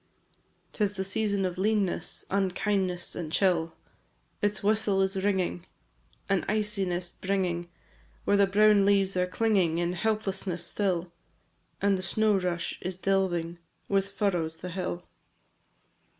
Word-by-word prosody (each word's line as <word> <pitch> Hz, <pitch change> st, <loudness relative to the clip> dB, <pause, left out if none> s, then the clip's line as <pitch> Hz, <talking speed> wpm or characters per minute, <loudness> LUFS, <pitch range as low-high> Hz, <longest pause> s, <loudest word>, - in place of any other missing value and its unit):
V. -, -, -40 dB, 0.3 s
'Tis 205 Hz, -2 st, 0 dB
the 190 Hz, -, -2 dB
season 200 Hz, 0 st, 0 dB
of 180 Hz, 0 st, -3 dB
leanness, 205 Hz, -2 st, 0 dB
Unkindness, 190 Hz, -1 st, 0 dB
and 160 Hz, -3 st, -5 dB
chill; 170 Hz, -3 st, +2 dB, 0.7 s
Its 205 Hz, -1 st, 0 dB
whistle 210 Hz, -1 st, +2 dB
is 190 Hz, +1 st, +2 dB
ringing, 185 Hz, -3 st, 0 dB, 0.6 s
An 195 Hz, -2 st, +1 dB
iciness 195 Hz, -5 st, -1 dB
bringing, 180 Hz, -3 st, -2 dB, 0.6 s
Where 205 Hz, -, +3 dB
the 200 Hz, -1 st, +5 dB
brown 210 Hz, +1 st, +5 dB
leaves 195 Hz, -1 st, +3 dB
are 180 Hz, 0 st, +1 dB
clinging 185 Hz, -4 st, +2 dB
In 175 Hz, +1 st, 0 dB
helplessness, 195 Hz, -3 st, -1 dB
still, 180 Hz, -3 st, -1 dB, 0.7 s
And 200 Hz, -1 st, +3 dB
the -, -, -3 dB
snow 215 Hz, +2 st, +2 dB
rush 175 Hz, -2 st, -2 dB
is 185 Hz, 0 st, -3 dB
delving 175 Hz, -3 st, 0 dB, 0.3 s
With 195 Hz, 0 st, +1 dB
furrows 175 Hz, -6 st, -1 dB
the 180 Hz, -, -7 dB
hill. 180 Hz, -1 st, -3 dB
190 Hz, 130 wpm, -28 LUFS, 180-200 Hz, 0.7 s, the